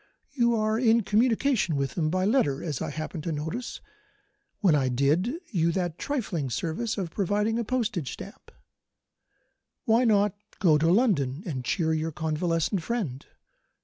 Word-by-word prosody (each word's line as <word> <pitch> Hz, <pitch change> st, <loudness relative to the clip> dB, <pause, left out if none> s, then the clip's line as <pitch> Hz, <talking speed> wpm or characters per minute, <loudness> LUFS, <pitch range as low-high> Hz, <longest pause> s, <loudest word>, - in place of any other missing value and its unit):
You 235 Hz, -4 st, +2 dB
are 215 Hz, 0 st, +1 dB
in 230 Hz, -2 st, +4 dB
communication 225 Hz, -, +2 dB
with 135 Hz, -3 st, -2 dB
him 155 Hz, -3 st, 0 dB
by 185 Hz, +3 st, 0 dB
letter, 195 Hz, -, +2 dB
as 150 Hz, -6 st, -3 dB
I -, -, -2 dB
happened 155 Hz, +2 st, -5 dB
to 170 Hz, -, -1 dB
notice 160 Hz, +11 st, -4 dB, 0.8 s
when 190 Hz, -7 st, +4 dB
I 135 Hz, -3 st, +2 dB
did 145 Hz, -, +2 dB, 0.2 s
you 170 Hz, -5 st, +2 dB
that 175 Hz, -3 st, -2 dB
trifling 195 Hz, -, -2 dB
service 170 Hz, -, -2 dB
of 180 Hz, -5 st, -3 dB
providing 210 Hz, +4 st, 0 dB
a -, -, 0 dB
postage 215 Hz, -, -1 dB
stamp. -, -, -11 dB, 1.3 s
Why 230 Hz, +2 st, +4 dB
not 205 Hz, -4 st, +3 dB, 0.2 s
go 160 Hz, -5 st, +4 dB
to 165 Hz, +2 st, +3 dB
London 175 Hz, -, +2 dB
and 135 Hz, -8 st, -4 dB
cheer 160 Hz, +4 st, 0 dB
your 160 Hz, +1 st, -1 dB
convalescent 165 Hz, +4 st, -1 dB
friend? 165 Hz, -, -3 dB
180 Hz, 150 wpm, -27 LUFS, 155-225 Hz, 1.3 s, in